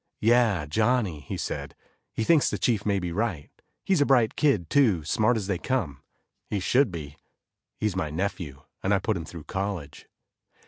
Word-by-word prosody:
"Yeah, 115 -7 +3
Johnny," 105 0 +1
he 70 - -6
said, - - -4 0.4
"he 110 - -2
thinks 155 +4 +4
the - - -2
chief 110 -4 0
may 100 -1 +2
be 90 -2 -3
right. 95 -6 -2 0.3
He's 190 -6 +2
a - - +5
bright 120 -5 +3
kid, 125 - +2
too, 105 - +3
smart 110 +10 +2
as 105 - -3
they 95 -3 -1
come. 90 - -2 0.5
He 105 - -1
should 125 +5 +3
be, 75 -4 -7 0.6
he's 105 -3 -1
my 80 -5 -1
nephew 80 -4 -4 0.2
and 100 +2 +2
I - - +3
put 105 +3 -1
him 85 -3 -4
through 85 -1 -9
college." 95 -7 -5
100 Hz, 180 wpm, -26 LUFS, 85-115 Hz, 0.6 s, a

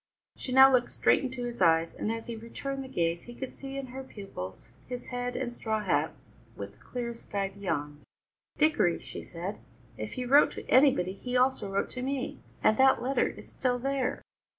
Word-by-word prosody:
She 255 - -6
now 265 +1 +9
looked 245 -1 +3
straight - - +3
into 255 -1 -3
his 240 -3 -5
eyes, 165 -1 +4
and 215 - -2
as 225 0 -4
he 235 - -5
returned 270 +5 -5
the - - -8
gaze 170 -7 -1
he 240 - -10
could 265 0 -6
see 275 0 -7
in 275 - -3
her 265 0 -5
pupils 195 - -8 0.2
his 250 -1 -6
head 245 0 -3
and 255 -1 -1
his 240 - -11
straw 220 -1 -1
hat, - - +1 0.4
with - - -6
the - - -24
clear 240 -1 -4
sky 200 -4 -3
beyond. 150 -7 -3 0.6
"Dickory," 300 - +3
she - - -8
said, 175 +4 -6 0.4
"if 110 - -4
he 250 - -3
wrote 280 +4 +6
to - - -8
anybody 255 -9 +5
he 250 +6 -2
also 250 -5 +2
wrote 195 - 0
to 255 - -5
me, 265 0 -2 0.2
and 215 - +5
that 265 0 +6
letter 270 +2 +2
is - - -9
still 250 -2 0
there." 270 +1 -1
245 Hz, 200 wpm, -29 LUFS, 200-265 Hz, 0.6 s, now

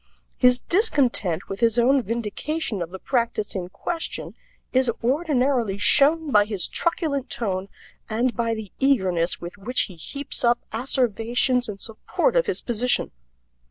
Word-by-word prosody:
His 250 -1 +4
discontent 255 - +1
with 195 - -6
his 230 -1 +2
own 260 +3 +4
vindication 230 - -3
of 170 - -3
the 190 - -8
practice 230 -2 -1
in 180 -2 -4
question 330 - -4 0.4
is 260 -1 +3
ordinarily 260 - +1
shown 295 +9 +4
by 210 -3 +5
his 205 -4 +1
truculent 295 -6 -1
tone 195 -4 -3 0.4
and 235 +3 0
by 230 -1 0
the 215 -4 -8
eagerness 190 -11 +1
with 175 +4 -9
which 245 +6 -1
he 185 - -4
heaps 280 - -3
up 240 0 +4 0.2
asseverations 245 0 +1
in 205 - -5
support 230 - -2
of - - +3
his 405 - -2
position. 245 +1 0
235 Hz, 145 wpm, -24 LUFS, 205-275 Hz, 0.4 s, by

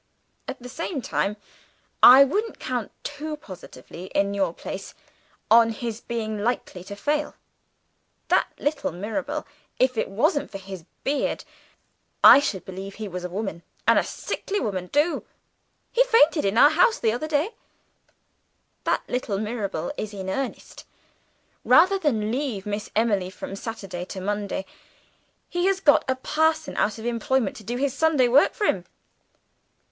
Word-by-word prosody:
At - - -5
the 250 - -9
same 315 +3 -4
time 205 +2 -1 0.6
I 260 +3 +10
wouldn't 415 - -1
count 245 -4 -3
too 300 +1 -5
positively, 180 - -11
in 200 0 +2
your 195 -4 0
place, - - -8 0.6
on 230 0 +7
his 225 0 -5
being 220 -3 -3
likely 215 -6 -2
to 200 - -7
fail. 295 +8 -1 0.9
That - - +3
little 290 0 -1
Mirabel 210 - -4 0.3
if 255 -3 +2
it - - -1
wasn't 290 - +1
for 200 - -6
his 190 -3 -9 0.2
beard, 285 +1 -1 0.8
I - - +11
should 205 -10 -3
believe 190 +1 -7
he 215 -1 -5
was 180 -1 -6
a 180 - -4
woman, 190 -3 -4 0.3
and - - +6
a - - 0
sickly 410 +1 -4
woman 185 -6 -3
too; 295 +4 +1 0.7
he - - +4
fainted 330 - +4
in 195 +3 0
our 290 +5 +8
house 440 +9 +4
the 220 - +1
other 245 +7 -3
day 310 +7 0 1.3
that - - +1
little 245 -5 -2
Mirabel 215 +2 -3
is 215 -1 -5
in 190 -1 -4
earnest. 270 +6 -5 0.8
Rather 375 +4 +5
than 220 - 0
leave 250 -7 -2
Miss 210 0 -4
Emily 205 -5 +1
from 190 +1 -7
Saturday 195 -5 -6
to 190 - -7
Monday, 200 0 -3 0.8
he 350 +1 0
has 390 -1 +2
got 290 -6 +5
a 260 - +2
parson 315 +4 0
out 210 +1 +1
of 220 - -8
employment 240 -1 0
to 215 - -11
do 240 +4 -3
his 275 0 0
Sunday 295 -4 +3
work 260 +4 +4
for 420 - -1
him. 180 - 0
230 Hz, 155 wpm, -24 LUFS, 200-290 Hz, 1.3 s, I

